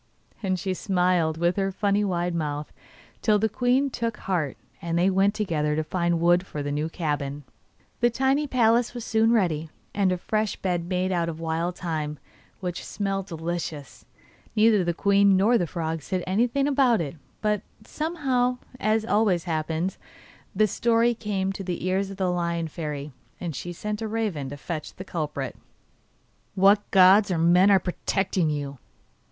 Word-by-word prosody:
And 190 -3 0
she 190 0 -2
smiled 180 -3 +1
with 175 +2 +1
her 195 -1 0
funny 205 +1 +1
wide 175 -3 -1
mouth, 150 -2 -3 0.5
till 215 -2 +4
the 220 +2 +2
queen 255 +5 +1
took 230 -2 -2
heart, 165 -8 -2 0.2
and 170 0 -1
they 180 +3 +3
went 195 +2 +2
together 155 -8 0
to 155 - 0
find 170 +1 0
wood 175 +2 +4
for 150 -6 -6
the 145 - -3
new 150 +2 -1
cabin. 145 -4 -3 0.6
The 240 - +4
tiny 270 +4 +1
palace 240 -1 +2
was 240 - -5
soon 225 0 +3
ready, 165 -8 +1 0.2
and 195 -2 +2
a 180 - 0
fresh 215 +3 -1
bed 175 -2 -2
made 185 0 0
of 170 -3 -1
wild 165 +2 -2
thyme, 155 -4 -3 0.4
which 180 -1 -4
smelt 195 -2 -3
delicious. 165 -3 -5 0.5
Neither 215 -2 +5
the 170 -1 -1
queen 200 0 +4
nor 225 +5 +4
the 175 - 0
frog 160 -1 -3
said 185 +4 -3
anything 240 +9 +1
about 260 -6 +3
it, 155 -2 -3 0.2
but 210 -2 0 0.2
somehow, 265 -6 0 0.2
as 220 +1 +1
always 205 -6 +2
happens, 160 +2 -2 0.6
the 215 - +4
story 230 +3 +2
came 195 -4 -2
to 195 - -6
the 180 -2 -4
ears 190 +1 0
of 195 - -8
the 185 -2 +1
Lion 170 -1 -1
Fairy, 150 -2 -5 0.3
and 170 -5 -4
she 175 - -5
sent 210 +5 -4
a 220 - -2
raven 210 -11 -2
to 145 - -7
fetch 155 +1 -6
the 185 - -8
culprit. 150 -7 -4 1.0
'What 200 +2 +4
gods 195 +2 +6
or 180 - 0
men 175 +4 +5
are 200 - +7
protecting 185 -1 -1
you? 140 -3 -4
185 Hz, 170 wpm, -25 LUFS, 165-210 Hz, 1.0 s, are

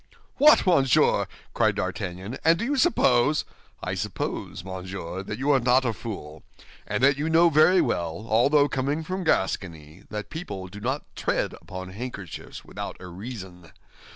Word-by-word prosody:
"What, 300 -3 +6
monsieur!" 140 - +4 0.3
cried - - +2
D'Artagnan, 95 +7 -4
"and 165 +1 +5
do 230 - -2
you 285 +4 0
suppose—" 150 - +3 0.4
"I - - -2
suppose, 90 - -4
monsieur, 95 -1 -6
that 105 +2 -6
you 140 +3 +1
are 135 - +5
not 125 +2 +3
a 115 - +1
fool, 80 -10 -7 0.5
and - - -1
that 140 0 +5
you 155 +2 -1
knew 165 +1 +5
very 170 +5 +6
well, 85 +4 -2
although 140 +7 +4
coming 140 +4 -1
from 185 +3 -3
Gascony, 90 - -1
that 105 -1 -6
people 100 - -6
do 100 +3 -10
not 130 +7 -2
tread - - -1
upon 95 0 -8
handkerchiefs 100 -4 -8
without - - -6
a - - -10
reason. 90 -3 -9
120 Hz, 155 wpm, -25 LUFS, 95-150 Hz, 0.5 s, What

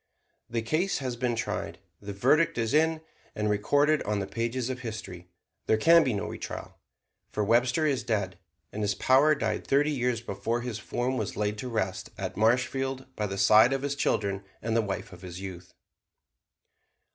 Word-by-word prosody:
The 115 -1 -2
case 160 +11 0
has 130 -3 -3
been 120 0 -1
tried, 115 - -3 0.2
the 100 0 -6
verdict 135 +12 +3
is 115 0 0
in 160 +1 +3 0.3
and 105 0 0
recorded 145 +9 +2
on 105 0 -1
the 100 - -1
pages 120 +3 -2
of 130 -1 -4
history. 105 -7 -7 0.4
There 110 - +4
can 165 +8 +6
be 130 - 0
no 100 - -2
retrial, - - -7 0.5
for 105 - -1
Webster 120 +7 +3
is 140 -4 +1
dead, 100 -6 -2 0.3
and 105 - -4
his 105 -1 0
power 140 +7 +4
died 110 -6 -2
thirty 145 +2 +3
years 125 -4 0
before 115 +1 -3
his 120 -3 -4
form 125 +5 -2
was 110 -4 -3
laid 105 0 -1
to 125 - -4
rest 105 -5 -2
at - - -4
Marshfield 130 +4 0
by 105 - -1
the 100 0 -5
side 110 +6 +6
of 135 0 -2
his 140 0 -1
children 100 -8 0 0.2
and 115 0 -2
the 115 - +4
wife 100 -2 -5
of 90 - -12
his 90 -1 -8
youth. 95 -2 -9
115 Hz, 180 wpm, -28 LUFS, 105-130 Hz, 0.5 s, can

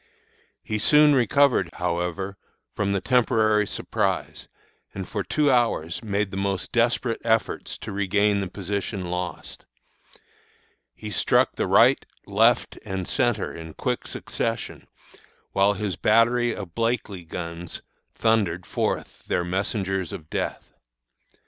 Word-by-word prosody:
"He 105 0 -2
soon 150 +6 +6
recovered, 130 - +3
however, 90 +2 -2 0.4
from 100 -1 -1
the 100 -1 0
temporary 110 -3 +3
surprise, - - -2 0.5
and 95 -1 -5
for 100 -3 -3
two 140 - +2
hours 115 -9 +1
made 100 -2 -1
most 95 -1 -2
desperate 120 0 +1
efforts 110 -1 0
to - - -7
regain 100 +1 +2
the 95 - -2
position 100 -1 -4
lost. 90 -2 -5 1.3
He - - -7
struck - - +2
the - - -1
right, - - +5 0.2
left, - - +2
and 95 -2 -4
centre 120 -6 0
in 80 -1 -9
quick - - -2
succession, 115 0 -4 0.6
while 100 +1 +3
his 100 -2 -3
battery 120 +2 +3
of 95 -5 -8
Blakely 115 -5 -1
guns 85 0 -6 0.3
thundered 100 -6 +1
forth - - -2
their 90 - 0
messengers 95 0 -2
of 75 -1 -9
death. - - -4
100 Hz, 120 wpm, -25 LUFS, 90-115 Hz, 1.3 s, soon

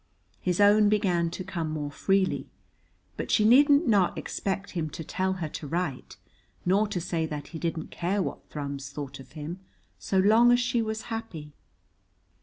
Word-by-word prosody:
His 180 0 -1
own 205 +1 +6
began 180 -5 +2
to 175 +3 -6
come 170 -4 -3
more 150 -2 -3
freely. 195 +5 0 0.7
But - - -4
she 210 - +3
needn't 285 +6 +6
not 200 -5 +3
expect 195 0 -3
him 165 -4 -2
to 160 - -7
tell 190 +4 -1
her 170 -5 -4
to 150 - -7
write 165 -4 -3 0.5
nor 200 +4 +3
to 200 -3 -3
say 165 -2 -2
that 150 -2 -6
he 165 - -7
didn't 165 -1 -3
care 185 +4 -1
what - - -6
Thrums 140 -2 -5
thought 140 -1 -7
of 135 - -14
him 160 +4 -6 0.4
so 190 - -1
long 220 +5 +6
as 245 - +5
she 240 -1 +1
was 220 0 -3
happy. 165 -10 -6
180 Hz, 175 wpm, -27 LUFS, 155-205 Hz, 0.7 s, own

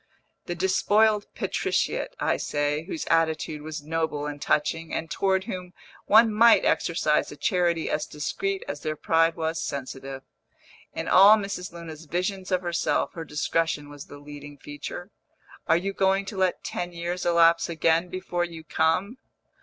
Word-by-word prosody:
the 175 - -3
despoiled 205 +3 +2
patriciate, - - -1
I - - +1
say, 145 +1 -1
whose 310 - -5
attitude 160 -2 0
was 155 -1 -6
noble 160 -1 -2
and 145 -1 -6
touching, 160 +3 0
and 165 - -4
toward 190 -1 +1
whom 180 -4 -7 0.3
one 220 +1 +6
might 230 +2 +6
exercise - - +1
a - - -8
charity 175 -4 +1
as 150 - -1
discreet 385 - -3
as 145 - -5
their 155 - -2
pride 165 +1 +2
was 160 0 -2
sensitive. 135 -1 -6 0.7
In - - -4
all 200 +3 +8
Mrs. 195 -3 -5
Luna's 165 -2 -9
visions 185 +4 -3
of 185 0 +1
herself, 175 -1 0
her 165 - -6
discretion 150 -1 -1
was 145 -1 -10
the 145 - -12
leading 145 0 -11
feature. 145 +7 -8 0.6
"Are 165 - +5
you 195 +3 -3
going 195 0 +2
to 200 - -7
let 185 -1 0
ten 175 0 -4
years 175 +1 -4
elapse 170 -1 +4
again 165 +1 +1
before 180 -1 -2
you 165 -2 -7
come?" 165 - 0
170 Hz, 155 wpm, -26 LUFS, 155-190 Hz, 0.7 s, all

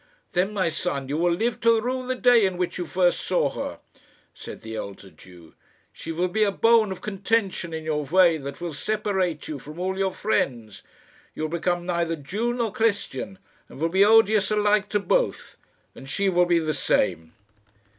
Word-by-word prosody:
"Then, 190 +1 +1
my 195 -5 0
son, 150 -5 -3
you 145 - -1
will 175 +1 +2
live 225 +5 -1
to 230 -1 +4
rue 255 +2 -3
the 255 - -1
day 245 -2 +5
in 190 -2 0
which 180 0 -2
you 175 - -3
first 180 -1 +2
saw - - 0
her," - - -5 0.6
said - - -10
the 110 0 -7
elder 100 -2 -8
Jew. 85 0 -16 0.4
"She - - -7
will 175 +3 0
be 215 +4 +1
a 205 - +2
bone 225 0 +3
of 185 -1 -6
contention 195 -3 -1
in 160 0 -5
your 150 -2 -2
way 170 +2 +4
that 140 -1 -7
will 170 -2 -5
separate 190 -2 -2
you 150 -3 -5
from 150 +5 -11
all 190 +1 -2
your 190 -1 +1
friends. 120 - -2 0.5
You - - -4
will 155 - -1
become 175 +1 -1
neither 170 -2 -1
Jew 200 +11 -3
nor 235 -3 -1
Christian, 210 -4 -1 0.3
and - - -12
will 165 +2 +1
be 190 +3 +4
odious 215 -1 +5
alike 210 -1 +2
to 205 - +1
both. - - -1 0.4
And 135 - -12
she 195 +7 0
will 180 -1 +3
be 175 -1 +3
the 155 -2 0
same." 80 - 0
180 Hz, 195 wpm, -24 LUFS, 155-210 Hz, 0.6 s, day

